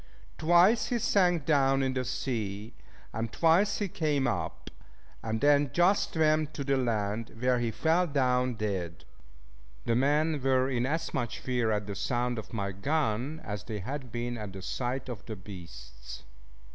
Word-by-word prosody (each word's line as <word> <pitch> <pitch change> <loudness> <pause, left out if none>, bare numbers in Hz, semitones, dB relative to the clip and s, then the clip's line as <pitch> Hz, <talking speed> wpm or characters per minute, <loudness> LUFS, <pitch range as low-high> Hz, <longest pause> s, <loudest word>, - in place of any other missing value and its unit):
Twice 175 +8 +5
he 245 - 0
sank 180 -8 +2
down 135 -3 +3
in 130 -1 0
the 130 -1 -1
sea, 110 -4 -3 0.4
and 115 0 -3
twice 175 - +3
he 205 - -1
came 150 -6 0
up; 90 -10 -3 0.5
and 110 0 -2
then 145 -1 +4
just 180 +4 +3
swam 155 -1 +3
to 140 - -4
the 140 0 +1
land, 115 -3 -1
where 125 0 +2
he 120 -1 0
fell 165 +9 +2
down 125 -4 +1
dead. 95 -6 -3 0.8
The 115 - +1
men 150 +3 +2
were 130 0 +2
in 125 0 0
as 160 +4 -2
much 125 -6 -2
fear 125 -3 -1
at 105 -1 0
the 100 - -5
sound 120 +4 -1
of 110 - -10
my 100 -3 -2
gun, 140 +5 -1
as 105 -2 -5
they 110 -2 -4
had 130 +5 -6
been 120 0 -3
at 105 -3 -6
the 95 -1 -8
sight 125 +7 -3
of 120 -6 -6
the 110 - -4
beasts. 65 - -11
125 Hz, 170 wpm, -29 LUFS, 110-150 Hz, 0.8 s, Twice